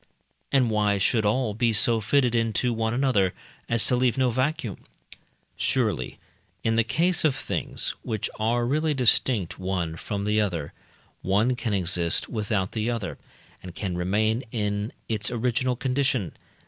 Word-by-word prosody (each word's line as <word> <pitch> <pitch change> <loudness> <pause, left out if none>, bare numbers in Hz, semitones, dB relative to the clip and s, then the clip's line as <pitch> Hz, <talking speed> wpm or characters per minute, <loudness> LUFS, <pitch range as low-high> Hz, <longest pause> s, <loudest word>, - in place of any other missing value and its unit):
And 130 -5 +3
why 105 -1 +2
should 105 +2 +2
all 110 0 +1
be 115 +1 +1
so 115 +2 +3
fitted 125 +2 +2
into 115 +1 +1
one 110 0 0
another 120 -7 +2 0.3
as 115 -2 +2
to 125 - +2
leave 125 0 +2
no 130 -2 +3
vacuum? 130 - -2 0.7
Surely - - 0 0.5
in 115 - +2
the 115 - +4
case 165 +11 +1
of 150 -4 +3
things, - - -3
which 110 -3 -2
are 120 +2 +1
really 150 +4 +1
distinct 120 -6 +2
one 90 -3 -2
from 100 +4 -4
the 105 +1 +2
other, 85 -8 -2 0.5
one 105 +7 +2
can 115 -4 -1
exist 85 -2 0
without 105 -4 -1
the 110 +1 -1
other, 115 -6 -3 0.4
and 90 -2 -10
can 95 -4 -3
remain 110 +7 +1
in 105 -1 -2 0.2
its 105 -1 0
original 125 +1 0
condition. 130 -6 0
110 Hz, 150 wpm, -26 LUFS, 100-125 Hz, 0.7 s, the